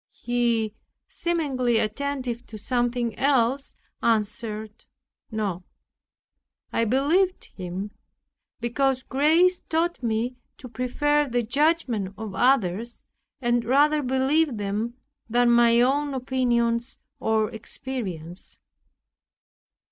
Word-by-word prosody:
He, 235 -3 +1 0.3
seemingly 270 -9 0
attentive 250 +2 -2
to 220 - -9
something 240 +1 -1
else, 270 0 +2 0.3
answered, 220 -1 -1 0.4
"No." 205 -5 -2 1.1
I 230 - +2
believed 310 - +1
him; 185 +2 -5 0.7
because 260 +2 0
grace 325 +8 +3
taught 335 0 -1
me 235 +1 -1 0.2
to 255 - -10
prefer 290 +4 0
the 240 0 0
judgment 245 - +1
of 220 -3 -6
others, 235 -1 +1 0.4
and 240 -1 +2
rather 290 +5 +3
believe 265 +1 +1
them 210 +4 -2 0.3
than 240 +1 +4
my 235 0 +5
own 280 +2 +1
opinions 240 -2 0 0.2
or 220 0 +1
experience. 200 -7 -5
240 Hz, 95 wpm, -25 LUFS, 220-275 Hz, 1.1 s, my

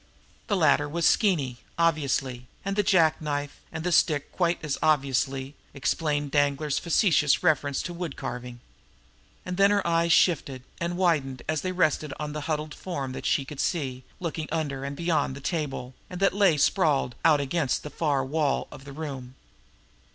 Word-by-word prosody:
The 205 - +1
latter 145 -3 +3
was 170 +2 -1
Skeeny, 150 - +2 0.2
obviously; 140 -6 0 0.2
and 195 0 -1
the 205 - +3
jack 165 -6 +3
knife 145 -1 -3
and 160 - -5
the 180 - 0
stick, 150 -3 +2
quite 175 -1 +1
as 145 - -2
obviously, 135 -2 +1 0.2
explained 145 0 -1
Danglar's 145 0 +1
facetious 165 -4 +3
reference 145 -4 +1
to 175 - -5
wood 170 -4 -5
carving. 120 0 -6 0.8
And 180 0 -4
then 200 0 +6
her 205 -1 +1
eyes 170 0 +2
shifted, 145 -7 +2 0.2
and 170 +1 -2
widened 150 -8 +1
as 155 -1 0
they 185 - -2
rested 155 -5 +1
on 150 0 -4
a 150 - -3
huddled 150 0 -3
form 140 -8 -5
that - - -4
she 140 - +1
could 145 0 -9
see 135 -8 -1 0.2
by 180 - -6
looking 160 -1 -3
under 145 -4 -2
and 140 +1 -4
beyond 155 -5 0
the - - -8
table, 140 -4 -3 0.2
and 180 - -6
that 195 -1 +3
lay 195 -6 +4
sprawled 145 -6 +2
out 155 -2 +5
against 140 0 -1
the 150 - -7
far 145 -5 0
wall 145 0 0
of 135 - -11
the 140 - -9
room. 135 -4 -6
150 Hz, 175 wpm, -26 LUFS, 140-170 Hz, 0.8 s, then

